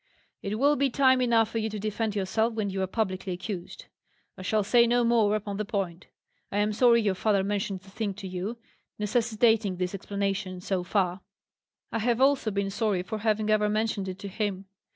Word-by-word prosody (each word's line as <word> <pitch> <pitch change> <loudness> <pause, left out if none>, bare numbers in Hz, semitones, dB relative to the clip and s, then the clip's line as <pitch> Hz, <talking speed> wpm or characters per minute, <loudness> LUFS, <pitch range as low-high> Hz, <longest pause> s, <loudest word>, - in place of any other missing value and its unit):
"It 205 +2 -3
will 285 +4 +4
be 275 0 +2
time 260 0 +4
enough 230 -2 +3
for 225 - -1
you 220 0 -1
to 215 - -5
defend 215 +1 -2
yourself 220 +4 0
when 210 -3 -1
you 190 0 -2
are 190 - 0
publicly 190 -2 -2
accused. 180 0 -6 0.5
I - - -10
shall 210 +3 +1
say 235 +4 +4
no 240 +1 +3
more 225 -3 +3
upon 205 -1 -3
the 215 - -1
point. 195 -5 -3 0.4
I 200 - -2
am 210 +1 +1
sorry 235 0 +5
your 200 -2 +2
father 200 0 +1
mentioned 200 -1 -2
the 195 +1 -17
thing 205 -1 -3
to 200 -1 -7
you, 185 +6 -4 0.4
necessitating 220 -1 +2
this 180 +1 -2
explanation, 195 -1 -3
so 185 0 -2
far; 185 -1 0 0.7
I 230 - -1
have 235 +1 +1
also 270 -3 +3
been 200 -1 -1
sorry 200 -3 0
for 215 +4 -5
having 215 0 +1
ever 210 -1 +3
mentioned 215 -2 -1
it 185 -1 -5
to 200 - -7
him. 195 -1 -3
210 Hz, 200 wpm, -27 LUFS, 195-225 Hz, 0.7 s, sorry